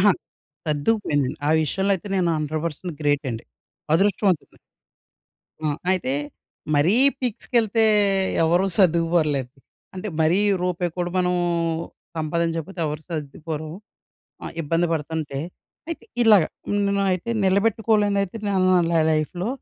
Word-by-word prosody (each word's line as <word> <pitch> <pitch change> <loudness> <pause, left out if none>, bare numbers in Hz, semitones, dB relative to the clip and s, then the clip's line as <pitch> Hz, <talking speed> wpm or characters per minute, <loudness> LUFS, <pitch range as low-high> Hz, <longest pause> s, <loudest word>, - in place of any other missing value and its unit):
అహా! 205 +1 +6 0.5
సర్దుకుపోయింది. 145 - +1 0.2
ఆ - - +3
విషయంలో 195 +6 0
అయితే 195 - -10
నేను 175 -2 +2
100% 155 +3 -3
గ్రేట్ 145 0 +1
అండి. 115 0 -6 0.5
అదృష్టవంతుడ్ని. 195 -1 +1 1.1
ఆ! - - +2 0.2
అయితే 180 -8 0 0.6
మరీ 155 +8 +4 0.3
పీక్స్‌కెళ్తే 230 -2 +1 0.6
ఎవరూ 175 +4 +3
సర్దుకుపోరులేండి. 165 -7 +2 0.4
అంటే 190 +3 -5
మరీ 165 +5 +3 0.2
రూపాయిక్కూడా 175 -1 -2
మనం 180 0 +1 0.8
సంపాదించకపోతే 165 +3 -2
ఎవరు 150 +1 -4
సర్దుకుపోరు. 155 0 -5 0.7
ఆహ్, - - -6
ఇబ్బంది 165 +3 +1
పడుతుంటే. 155 -2 -3 0.5
అయితే 330 -8 -5 0.2
ఇలాగ. 215 -5 +7 0.5
నేనయితే 195 +1 0
నిలబెట్టుకోలేనిదయితే 205 0 +2
నేను 190 -2 +2
న - - +5
న - - -1
నా - - +4
లైఫ్‌‌లో 165 +5 -1
175 Hz, 105 wpm, -23 LUFS, 155-195 Hz, 1.1 s, ఇలాగ